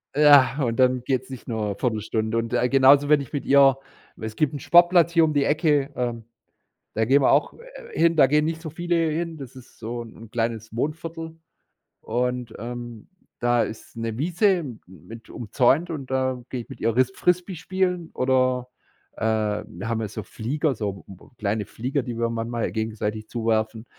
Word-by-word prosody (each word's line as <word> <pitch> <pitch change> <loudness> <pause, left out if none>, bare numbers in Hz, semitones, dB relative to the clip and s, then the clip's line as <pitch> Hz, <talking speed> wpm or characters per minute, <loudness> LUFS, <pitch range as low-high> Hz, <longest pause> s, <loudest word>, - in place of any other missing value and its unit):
Ja, 145 -2 +6
und 115 0 -1
dann 125 -1 +3
geht's 130 0 -1
nicht 130 -3 -9
nur 105 -4 -2
1/4 110 -4 -1
Stunde. 110 +1 -2
Und, 115 0 -2
äh, 125 - +2
genauso, 140 +2 +5
wenn 150 -2 +5
ich 135 - -10
mit 140 -2 -3
ihr 135 -1 +5 0.4
weil 110 - -7
es 110 - -8
gibt 150 -1 0
'n 145 - -4
Sportplatz 175 +1 +5
hier 165 -1 +4
um 155 -1 +2
die 145 -1 +2
Ecke, 150 -2 +1
ähm, 120 -2 -3 0.7
da 110 - +1
gehen 135 +4 +4
wir - - +4
auch, 145 - +2
äh, - - -13
hin, 165 -1 +3
da 140 - +7
gehen 150 +3 +2
nicht 160 0 -2
so 160 -2 -7
viele 175 +2 -1
hin, 165 +1 -3
das 135 -3 -10
ist 130 -2 -15
so 120 +1 -5
'n 115 -1 -13
kleines 115 -2 -3
Wohnviertel. 160 +4 -4 0.7
Und, 125 0 -2
ähm, 120 -1 -7 0.3
da 120 -1 +2
ist 110 - -8
'ne 115 0 -3
Wiese 175 +2 +2 0.2
mit 95 +6 -13
umzäunt 125 - +1
und 140 -5 -6
da 130 -2 -1
gehe 125 -2 -4
ich - - -15
mit - - -10
ihr 115 0 0
ris 130 0 +3
Frisbee 180 +1 0
spielen 180 0 -2
oder, 130 -1 +1 0.5
äh - - -6 0.4
wir 100 +6 -7
haben 115 -1 -1
ja 110 - -2
so 110 +2 -6
Flieger, 140 +7 -2
so 100 -3 -4
m 95 - -11
m - - -19
kleine 105 0 -1
Flieger, 130 +5 -3
die 120 -1 -5
wir 115 0 +1
manchmal 115 0 -3
gegenseitig 110 -1 -3
zuwerfen. 110 -1 -1
125 Hz, 195 wpm, -24 LUFS, 115-150 Hz, 0.7 s, da